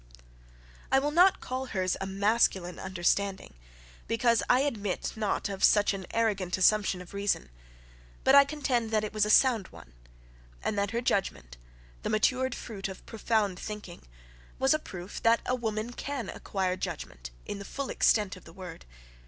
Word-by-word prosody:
I 265 - +5
will 290 +2 +1
not 360 +4 +5
call 260 +1 -4
her's 185 -5 -1
a 195 - -2
masculine 195 -2 +1
understanding, 190 - -1 0.5
because 230 0 +2
I 250 +1 +5
admit 210 -9 -2
not 215 -2 -1
of 195 -1 -5
such 205 -1 +5
an 190 -2 -6
arrogant 200 -6 0
assumption 190 -1 +3
of 180 - -16
reason; 200 - -1 0.7
but 265 - +5
I 280 0 +10
contend 275 -6 -1
that 215 -1 +1
it 215 - -4
was 215 -1 +2
a - - -2
sound 225 -4 +4
one, - - -15 0.7
and 215 - -1
that 200 -1 0
her 235 +2 -2
judgment, 125 - -1 0.5
the - - -3
matured 255 +4 +1
fruit 200 -5 -6
of 190 -1 -10
profound 215 -4 0
thinking, 210 -5 -7 0.6
was 265 +2 +3
a 310 - +1
proof 185 -8 -8
that 230 0 +4
a 250 - 0
woman 225 -1 -2
can 270 -5 -4
acquire 190 -2 -2
judgment, 65 - -6 0.2
in 200 - -5
the - - -6
full 275 +6 -5
extent 205 -3 +2
of 185 - -14
the 165 - -13
word. 180 - -9
210 Hz, 170 wpm, -29 LUFS, 190-235 Hz, 0.7 s, I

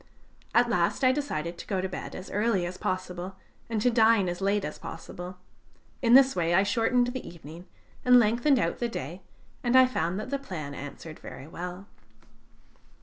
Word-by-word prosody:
At 240 0 +5
last 195 +3 +1
I 255 - +6
decided 170 - -3
to - - -8
go 195 - -1
to 190 - -1
bed 185 - -7
as 185 - -8
early 205 -3 +1
as 175 +1 -5
possible, 185 0 -4 0.3
and 225 -2 -1
to 245 - +4
dine 225 -4 +4
as 175 +2 -5
late 200 +1 +1
as - - -6
possible; 180 +2 -8 0.6
in 240 -1 +6
this 270 0 +7
way 170 -1 +1
I 190 - +5
shortened 245 +3 +2
the 255 +1 -6
evening 170 +2 -11 0.4
and 250 -1 +7
lengthened 240 +5 +4
out 170 -8 0
the 240 - -1
day, 170 - -6 0.4
and 245 0 +2
I 260 0 +9
found 185 -7 -1
that 255 +5 -6
the 280 - 0
plan 155 - -6
answered 145 +3 -8
very - - -9
well. 180 +3 -7
195 Hz, 185 wpm, -28 LUFS, 175-240 Hz, 0.6 s, I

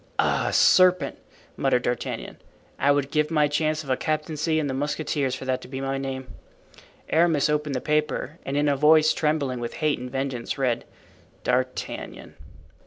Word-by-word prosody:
"Ah! - - +1
serpent," 180 -6 +4 0.4
muttered 125 -2 +1
D'Artagnan, 120 - -3 0.4
"I 140 - +2
would 140 -1 +2
give 150 -1 +1
my 150 -2 +3
chance 155 +1 0
of 140 - -11
a - - +4
captaincy 155 +2 -1
in 155 - 0
the 135 - -2
mousquetaires 145 -1 -1
for 130 - -8
that 130 -1 -1
to - - -11
be 130 0 -6
my 135 0 -2
name." 130 -1 -5 0.8
Aramis 160 -3 +3
opened 150 -2 -1
the 130 - -2
paper, 150 +1 -1
and 135 +1 -3
in 145 0 +2
a 145 - +3
voice 155 +2 +5
trembling 150 -5 0
with 120 0 -5
hate 155 -4 0
and 125 +1 -6
vengeance 135 -2 -3
read 125 -4 0 0.6
"D'Artagnan." 125 +1 -3
145 Hz, 170 wpm, -25 LUFS, 130-155 Hz, 0.8 s, voice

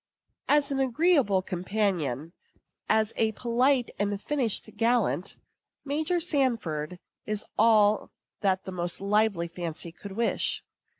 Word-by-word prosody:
As 290 -1 +3
an 270 - 0
agreeable 265 - +3
companion, 180 - -2 0.6
as 220 0 +2
a 220 -1 +2
polite 245 +3 +1
and 205 0 0
finished 250 -2 -1
gallant, 230 -4 +1 0.5
Major 310 +5 0
Sanford 230 - 0 0.3
is 215 -1 -2
all 215 -2 +4 0.3
that 190 -2 +1
the 190 - -7
most 175 -1 -2
lively 200 -3 +1
fancy 170 -1 -5
could 195 +3 -10
wish. 230 +3 0
215 Hz, 115 wpm, -27 LUFS, 185-250 Hz, 0.6 s, all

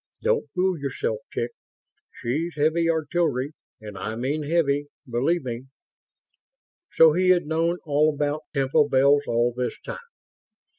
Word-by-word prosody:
"Don't 465 -1 +1
fool 185 -2 +1
yourself, 470 - -2
chick. - - -2 0.6
She's 150 +7 -3
heavy 160 +3 +2
artillery; 155 -4 0 0.3
and 105 -2 -9
I 110 +1 -4
mean 135 +6 -2
heavy, 145 -2 +1 0.2
believe 135 +8 0
me!" 120 0 -5 1.3
So 160 -1 +7
he 185 +2 +2
had 180 -3 +4
known 165 +3 0
all 150 +1 +3
about 150 +1 -2
Temple 140 +1 +2
Bells 140 +2 +4
all 120 +1 +1
this 125 0 -3
time! - - -5
150 Hz, 135 wpm, -24 LUFS, 135-165 Hz, 1.3 s, So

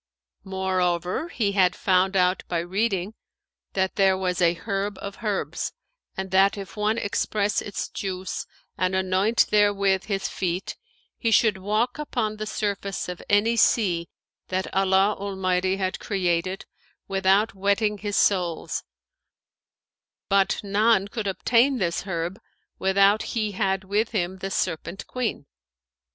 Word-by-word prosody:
Moreover, 185 - -1
he 210 -10 0
had 185 -2 +3
found 190 0 +2
out 180 0 +3
by 175 - -1
reading 190 +3 -1 0.6
that 190 -1 -1
there 190 -1 +4
was 180 -1 -1
a 170 0 +4
herb 195 +2 -3
of 200 0 -7
herbs 210 -3 -2 0.4
and 190 -1 -4
that 195 +2 +4
if 195 +2 -8
one 215 +1 0
express 205 -1 0
its 205 - -4
juice 185 -1 -4 0.3
and 185 +1 +1
anoint 190 +4 +2
therewith 200 -2 +3
his 195 -2 -1
feet, 180 0 -3 0.4
he 230 - +1
should 215 -3 +4
walk 215 +8 0
upon 220 -7 -2
the 215 0 -4
surface 200 -2 -2
of 180 -1 -6
any 210 +3 +3
sea 180 -8 +2 0.4
that 185 +1 -3
Allah 195 +1 +3
Almighty 190 -1 0
had 185 -1 -2
created 185 -1 -1 0.4
without 195 +2 +2
wetting 200 +2 +1
his 205 0 -3
soles, 175 -5 +1 1.4
but 195 +1 +2
none 205 0 +2
could 220 -3 -4
obtain 240 +7 +3
this 175 -4 -1
herb, 170 +1 -3 0.4
without 195 +2 +4 0.2
he 215 -2 0
had 195 -1 0
with 205 +4 0
him 185 -2 -1
the 195 - -4
Serpent 170 0 -3
queen. 250 - -3
195 Hz, 135 wpm, -25 LUFS, 185-210 Hz, 1.4 s, there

